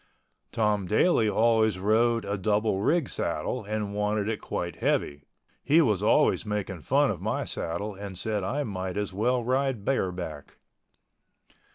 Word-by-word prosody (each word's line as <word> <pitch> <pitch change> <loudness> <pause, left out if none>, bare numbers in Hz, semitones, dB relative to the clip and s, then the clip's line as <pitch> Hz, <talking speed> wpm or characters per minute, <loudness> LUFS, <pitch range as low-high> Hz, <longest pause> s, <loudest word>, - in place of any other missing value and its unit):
Tom 105 -4 0
Daly 110 - +3
always 110 -2 +3
rode 115 +4 +2
a 100 - -2
double 105 0 0
rig 160 +4 +2
saddle 125 - -3
and 105 0 -3
wanted 105 0 0
it 110 -1 -2
quite 85 -2 -4
heavy. 70 0 -1 0.4
He 150 +4 +4
was 110 - +2
always 105 - +3
making 105 -4 -3
fun 65 - +2
of - - -6
my - - -1
saddle 95 +6 -3
and 100 -1 -8
said 105 +1 -2
I 140 +10 -1
might 95 -4 -4
as 105 -2 -2
well 120 +5 +1
ride 130 -3 0
bareback. 90 - -3
105 Hz, 150 wpm, -27 LUFS, 95-115 Hz, 0.4 s, He